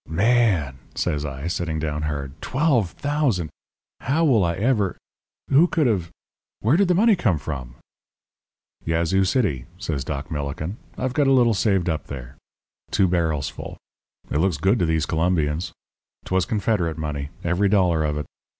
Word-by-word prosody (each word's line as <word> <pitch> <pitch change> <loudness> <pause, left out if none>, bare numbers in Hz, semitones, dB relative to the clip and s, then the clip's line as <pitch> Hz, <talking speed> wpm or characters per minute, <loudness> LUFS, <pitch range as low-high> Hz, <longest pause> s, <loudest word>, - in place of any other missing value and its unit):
"'Man!' 90 - +2 0.2
says 75 0 -1
I, 70 0 -5
sitting 85 -2 -2
down 75 -1 -2
hard 70 -3 -3
'twelve 130 - +1
thousand 140 - 0 0.5
how 155 +6 +1
will 120 -9 +4
I 85 -1 0
ever 105 -1 +1 0.5
who 150 +6 +6
could 160 -3 +1
have 95 -9 +1 0.5
where 115 +8 +3
did 195 +2 +3
the 180 - +3
money 220 +3 +5
come 110 - +1
from?' 65 -5 -6 1.1
"'Yazoo 85 +4 +1
City,' 95 - 0
says 80 -9 -3
Doc 75 +3 -5
Millikin: 75 +6 -4 0.2
'I've 130 -1 -2
got 145 -1 +2
a - - +4
little 120 -3 +5
saved 95 -3 +1
up 80 -3 -2
there. 65 -1 -8 0.5
Two 95 - +3
barrels 80 -5 0
full. - - -8 0.5
It 75 - +1
looks 90 -2 +1
good 95 +9 +2
to 85 - +2
these 80 -2 +1
Colombians. 80 -1 0 0.5
'Twas 95 -2 0
Confederate 100 -7 0
money, 75 -3 -4
every 90 +4 +2
dollar 90 -6 +3
of 75 -1 -1
it. 75 - -3
85 Hz, 160 wpm, -23 LUFS, 75-115 Hz, 1.1 s, who